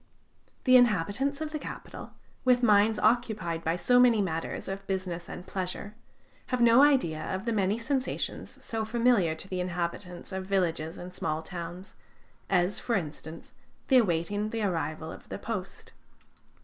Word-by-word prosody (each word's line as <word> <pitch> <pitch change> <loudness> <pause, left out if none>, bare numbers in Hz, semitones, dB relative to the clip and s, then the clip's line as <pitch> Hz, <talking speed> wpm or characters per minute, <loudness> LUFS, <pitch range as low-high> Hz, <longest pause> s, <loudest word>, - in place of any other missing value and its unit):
The 255 -1 +7
inhabitants 245 - +2
of 310 -1 -3
the 305 - -3
capital, - - -8 0.3
with 250 -1 +3
minds 215 -1 +5
occupied 215 -8 +1
by 165 +1 +1
so 245 +7 +4
many 240 -3 +6
matters 165 -5 -2
of 195 +1 -6
business 185 -3 -3
and 180 - -7
pleasure, 190 +2 -4 0.5
have 255 - -1
no 235 +2 +6
idea 260 - +3
of 190 +5 -4
the 235 - 0
many 200 0 +1
sensations 260 +3 -3
so 225 -1 -2
familiar 225 -7 +2
to 160 - -9
the 185 -1 -3
inhabitants 180 0 -4
of 190 0 -4
villages 170 -4 0
and 180 +1 -8
small 155 -3 -2
towns, 175 +2 -7 0.6
as, 185 +1 +2
for 235 - -1
instance, 160 -2 -6 0.4
the 265 - +7
awaiting 205 0 +1
the 225 0 -2
arrival 160 -4 -2
of - - -12
the - - -4
post. - - -6
195 Hz, 155 wpm, -29 LUFS, 170-235 Hz, 0.6 s, The